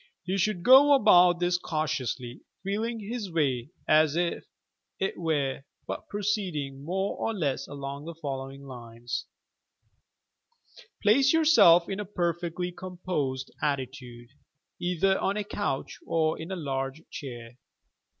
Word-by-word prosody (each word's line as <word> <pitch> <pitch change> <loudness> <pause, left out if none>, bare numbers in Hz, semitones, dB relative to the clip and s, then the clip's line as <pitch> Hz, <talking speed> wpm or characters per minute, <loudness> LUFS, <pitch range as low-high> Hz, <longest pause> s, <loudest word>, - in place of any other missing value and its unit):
He 185 +3 -1
should 180 -2 0
go 275 +4 +8
about 180 -7 +6
this 175 0 +1
cautiously, 140 -7 -3 0.2
feeling 220 +4 -2
bis 225 -3 -4
way, 140 -6 0 0.2
as 155 -1 +4
it 175 0 -1 0.7
were, 145 -6 -1 0.2
but - - -6
proceeding 185 -10 -2
more 190 +5 -1
or 225 - -2
less 145 -8 -1
along 140 +1 -6
the 170 0 -7
following 135 -3 -6
lines: 120 -2 -6 1.8
Place 265 +7 +5
yourself 300 - +6
in 195 0 -4
a 210 - -3
perfectly 175 -1 -2
composed 175 -8 -4
attitude, 130 -4 -4 0.5
either 180 +2 +1
on 200 +2 0
a 210 - -1
couch 200 -9 -3
or 160 -1 +1
in 165 +4 -7
a - - -2
large 135 -2 -3
chair. 120 -3 -8
165 Hz, 120 wpm, -28 LUFS, 135-190 Hz, 1.8 s, go